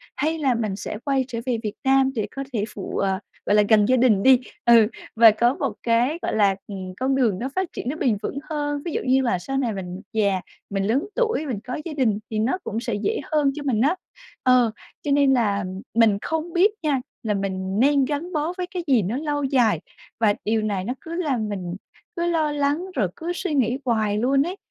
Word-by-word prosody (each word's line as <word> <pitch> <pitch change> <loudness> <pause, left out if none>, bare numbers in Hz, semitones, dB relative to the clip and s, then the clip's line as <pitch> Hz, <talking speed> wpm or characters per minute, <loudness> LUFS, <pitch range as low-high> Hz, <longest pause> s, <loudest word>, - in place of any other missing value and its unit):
Hay 315 +4 0
là 265 -4 +2
mình 215 -4 -2
sẽ 210 - -5
quay 270 -2 +1
trở 235 -3 -4
về 245 -2 0
Việt 210 -1 -3
Nam 270 0 +4
để 215 - -1
có 275 - -5
thể 210 - 0
phụ, 195 - -5
ờ, 190 -1 0 0.3
gọi 205 - +3
là 210 - +6
gần 215 -2 +6
gia 255 +4 +3
đình 225 -6 +4
đi. 260 -2 +7 0.3
Ừ, 230 -3 +7 0.3
và 225 -1 +8
có 235 +4 +2
một - - -2
cái, 240 +7 +2
gọi - - -2
là, 200 -2 +3
ừm, 190 -2 -6
con 265 +1 +1
đường 230 -8 +2
nó 255 +4 -3
phát 375 -2 -1
triển 245 - -4
nó 295 - -2
bền 240 -9 +1
vững 260 - -4
hơn. 290 -2 -2
Ví 340 - -2
dụ - - -1
như 260 +1 +4
là 235 -8 0
sau 270 +9 -3
này 245 -5 0
mình 185 0 -6
già, 200 -4 +1 0.3
mình 195 -1 -1
lớn 230 +8 +1
tuổi, 455 -10 +1
mình 240 -8 -3
có 250 +3 -4
gia 330 - -4
đình, 235 -8 +1
thì 215 - -1
nó 235 +11 +1
cũng 225 -5 -3
sẽ 235 -1 -3
dễ 225 - -1
hơn 295 -3 +3
cho 300 - -5
mình 240 -6 +1
á. 305 +7 +3 0.5
Ờ, 250 -3 +4 0.3
cho 290 - -1
nên 280 -1 +4
là 205 -5 +1 0.3
mình 225 -3 +5
không 320 +1 -3
biết 375 +5 +4
nha, 280 -4 +1 0.2
là 215 - 0
mình 190 0 -2
nên 280 +1 +4
gắn 300 +6 -3
bó 310 +2 -1
với 360 -1 -3
cái 355 - -3
gì 255 -6 +4
nó 205 +7 -2
lâu 290 -1 -2
dài, 255 -5 +2 0.4
và 215 -3 +4
điều 220 +1 +1
này 205 -3 -1
nó 240 +6 -2
cứ 330 - -8
làm 265 -11 -1
mình 180 -4 -4 0.4
cứ 340 0 -1
lo 315 -3 +1
lắng 290 +4 0
rồi 200 - +2
cứ 335 +2 -4
suy 360 -2 -3
nghĩ 255 -3 +2
hoài 215 -4 +1
luôn 270 +5 +3
ấy. 355 +4 -4
250 Hz, 235 wpm, -23 LUFS, 215-290 Hz, 0.5 s, và